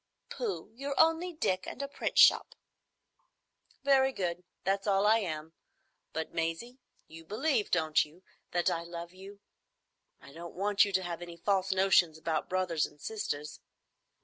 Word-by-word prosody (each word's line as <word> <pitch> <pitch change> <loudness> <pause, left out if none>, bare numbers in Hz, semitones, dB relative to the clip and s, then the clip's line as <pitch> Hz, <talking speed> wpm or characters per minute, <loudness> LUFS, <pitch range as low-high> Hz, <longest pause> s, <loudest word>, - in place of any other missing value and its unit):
"Pooh! 445 - -4
You're 275 +2 -4
only 325 +2 +4
Dick,—and 190 - -2
a - - -3
print 280 - -4
shop." - - +6 1.3
"Very 270 -1 +4
good: 180 -6 -3 0.2
that's 195 +2 0
all 195 0 +3
I 220 +2 +5
am. 160 -5 -5 0.6
But, 160 - -4
Maisie, 165 +11 -3 0.3
you 165 +1 -12
believe, 220 - 0
don't 160 -3 +3
you, 165 +5 -16 0.3
that 175 0 0
I 165 - -1
love 170 0 -8
you? 195 +2 -12 0.8
I 140 - -15
don't 170 +2 -9
want 205 +2 +3
you 200 - -4
to 190 -1 +1
have 175 -1 -5
any 170 -1 -8
false 195 +1 +1
notions 185 -4 +4
about 160 0 -2
brothers 180 -4 0
and 150 - -21
sisters." 150 -7 -4
185 Hz, 150 wpm, -31 LUFS, 165-215 Hz, 1.3 s, shop